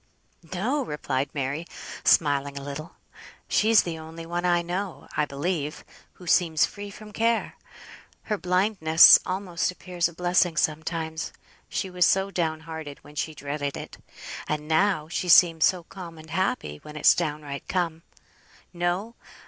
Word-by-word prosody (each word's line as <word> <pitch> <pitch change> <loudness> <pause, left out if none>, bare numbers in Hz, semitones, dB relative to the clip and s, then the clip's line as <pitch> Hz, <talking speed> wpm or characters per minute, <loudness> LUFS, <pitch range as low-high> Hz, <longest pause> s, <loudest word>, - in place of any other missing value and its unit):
"No!" 245 +11 0
replied 140 - -2
Mary, 145 +4 -3 0.4
smiling 140 -2 +3
a 140 - -6
little, 150 +4 -7 0.5
"she's 220 0 +4
the 165 -2 -5
only 160 +1 -9
one 175 +1 -3
I 175 -1 +3
know, 180 +2 -4
I 150 - +2
believe, 150 +1 -3 0.3
who 180 - -14
seems 165 -2 +3
free 205 0 -8
from 210 +1 -12
care. 230 +1 0 0.7
Her 210 - -2
blindness 180 -3 +6
almost 185 -2 -1
appears 180 -1 -2
a - - -14
blessing 175 -1 +2
sometimes; 160 +1 -1 0.4
she 190 - -3
was 180 -1 +3
so 195 +1 +2
downhearted 160 -3 -3
when 150 - -14
she 155 +1 -3
dreaded 145 0 -4
it, - - -9 0.5
and 150 0 -3
now 160 -1 +2
she 175 +2 -3
seems 165 -2 +7
so 180 -2 +1
calm 170 -2 -10
and 155 0 -13
happy 170 - -1
when 150 - -11
it's 150 - +6
downright 150 -4 -4
come. 170 -3 -1 0.7
No! 175 +6 -1
170 Hz, 145 wpm, -26 LUFS, 155-185 Hz, 0.7 s, seems